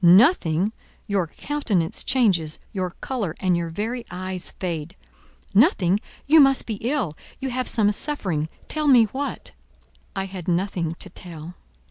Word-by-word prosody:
"Nothing! 190 - +5 0.3
Your 195 -5 0
countenance 200 - -1
changes: 185 -12 +2 0.2
your 185 -3 -1
colour 210 -11 -2
and 185 -2 +2
your 170 -1 -1
very 225 +8 -3
eyes 185 0 -4
fade. 170 -1 -3 0.6
Nothing! 200 - +4 0.3
You 315 +3 +7
must 270 -2 +5
be 220 -3 -3
ill; 240 - 0 0.2
you 265 -1 -3
have 255 0 -1
some 210 -2 +3
suffering; 190 - 0 0.2
tell 305 -1 -1
me 250 -5 +8
what." 265 +7 -4 0.6
I 195 -1 -1
had 185 -3 -8
nothing 175 -2 0
to 190 - -11
tell. 170 -2 -9
195 Hz, 140 wpm, -24 LUFS, 175-250 Hz, 0.6 s, me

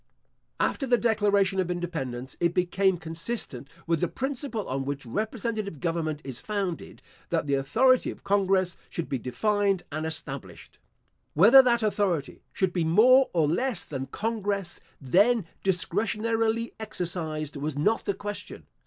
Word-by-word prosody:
After 270 - 0
the 245 -1 +4
declaration 205 -4 +2
of 180 -2 0
independence, 135 -8 -4
it 170 0 +1
became 185 +1 +2
consistent 165 - -4 0.2
with 165 -2 0
the 175 - +2
principle 265 - -4
on 135 +1 -2
which 140 0 -4
representative 215 - -3
government 160 -2 -2
is 130 -3 -6
founded, 200 -5 -4 0.3
that - - 0
the 140 - -1
authority 240 - +3
of - - -9
congress 195 -2 +1
should 170 - -4
be 135 - -2
defined 200 - 0
and 155 +2 -2
established. 135 - -8 0.6
Whether 220 - +9
that 240 -3 +2
authority 195 -8 0
should 190 -2 0
be 175 - +1
more 245 +11 +6
or 160 -4 +2
less 220 - -1
than 135 -2 -5
congress 205 -4 -2 0.2
then 200 - +3 0.2
discretionarily 220 +5 0
exercised 165 -8 -4
was 145 0 -3
not 210 +10 +1
the 200 - 0
question. 205 +1 -6
185 Hz, 140 wpm, -27 LUFS, 155-220 Hz, 0.6 s, Whether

